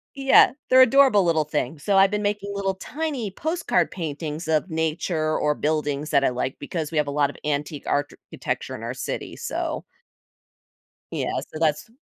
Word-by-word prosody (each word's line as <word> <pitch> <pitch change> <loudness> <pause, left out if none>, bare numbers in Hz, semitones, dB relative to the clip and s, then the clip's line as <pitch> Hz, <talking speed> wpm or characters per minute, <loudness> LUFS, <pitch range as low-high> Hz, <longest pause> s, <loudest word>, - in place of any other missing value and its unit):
yeah, 270 -2 +6 0.2
they're 260 0 +7
adorable 260 -5 +6
little 160 -2 +2
things, 150 -1 -3
so, 200 -1 +2
I've 195 0 +6
been 210 0 -1
making 205 -1 -2
little 195 -1 -1
tiny 275 -2 -4
postcard 315 - 0
paintings 160 -2 -5
of 160 +3 +1
nature 160 0 -1
or 150 0 +1
buildings 150 -1 -1
that 140 -2 +4
I - - +4
like 125 +1 -3
because 155 +1 -4
we 160 - -3
have 150 -1 +2
a - - -2
lot 145 -1 +2
of - - -10
antique 150 0 -2
architecture 145 0 -3
in - - -9
our - - -3
city, - - -5
so - - -3 1.3
Yeah, - - -2
so, 155 - -9
that's 155 +5 0
160 Hz, 175 wpm, -24 LUFS, 150-205 Hz, 1.3 s, they're